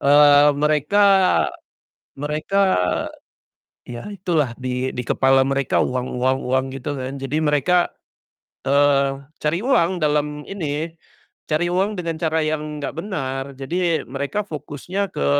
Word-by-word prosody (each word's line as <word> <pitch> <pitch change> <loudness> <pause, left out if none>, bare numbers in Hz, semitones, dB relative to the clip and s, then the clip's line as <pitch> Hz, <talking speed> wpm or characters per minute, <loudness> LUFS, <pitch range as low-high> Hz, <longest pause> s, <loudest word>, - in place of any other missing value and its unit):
Eee, 145 0 +6
mereka, 150 +7 +2 1.1
mereka 150 +7 -3 1.3
ya 120 -1 -7
itulah 170 -10 0
di 130 0 -2
di - - -4
kepala 135 +2 +3
mereka 135 -1 +1
uang 125 0 -1
uang 130 +1 +2
uang 130 +1 +1
gitu 145 +2 -4
kan. 130 0 -5
Jadi 135 +2 -3
mereka, 155 +4 +2 0.7
eee, 140 0 +3 0.2
cari 155 +4 0
uang 185 -9 +2
dalam 150 -2 -1
ini, 160 -4 -4 0.6
cari 160 +3 +1
uang 195 +3 0
dengan 165 -2 -3
cara 160 -1 +1
yang 155 -1 -3
nggak 145 - -4
benar. 135 -8 -3
Jadi 165 +4 -1
mereka 140 - -3
fokusnya 170 +5 -4
ke 70 - -3
150 Hz, 125 wpm, -21 LUFS, 135-165 Hz, 1.3 s, Eee